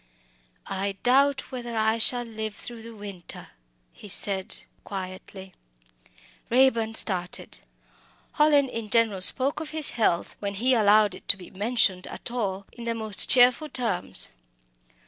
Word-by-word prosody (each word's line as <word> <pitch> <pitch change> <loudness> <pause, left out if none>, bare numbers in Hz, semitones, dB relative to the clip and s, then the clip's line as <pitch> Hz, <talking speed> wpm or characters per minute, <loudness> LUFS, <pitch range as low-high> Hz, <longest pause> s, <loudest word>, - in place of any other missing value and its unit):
"I 195 +1 -3
doubt 275 +2 +2
whether 240 -3 -6
I 220 +1 +1
shall 245 +2 +2
live 220 -2 -6
through 235 -2 -7
the 230 0 -11
winter," 200 -4 -10 0.4
he 210 - -13
said 190 0 -1 0.3
quietly. 190 0 -8 1.0
Raeburn 230 -3 +2
started. 180 -5 +1 0.7
Hallin 295 -2 +3
in 230 -4 -6
general 220 -4 +2
spoke 260 +9 +5
of 315 -1 -6
his 310 -2 +1
health, 210 -7 -1
when 200 -1 -4
he 250 +6 +1
allowed 210 -3 +4
it - - -13
to 200 - +4
be 180 - -13
mentioned 200 -2 0
at - - -7
all, 200 -5 -3
in 235 - -10
the 230 0 -2
most 220 -3 +2
cheerful 250 +4 +4
terms. 230 -9 -2
220 Hz, 140 wpm, -25 LUFS, 195-245 Hz, 1.0 s, spoke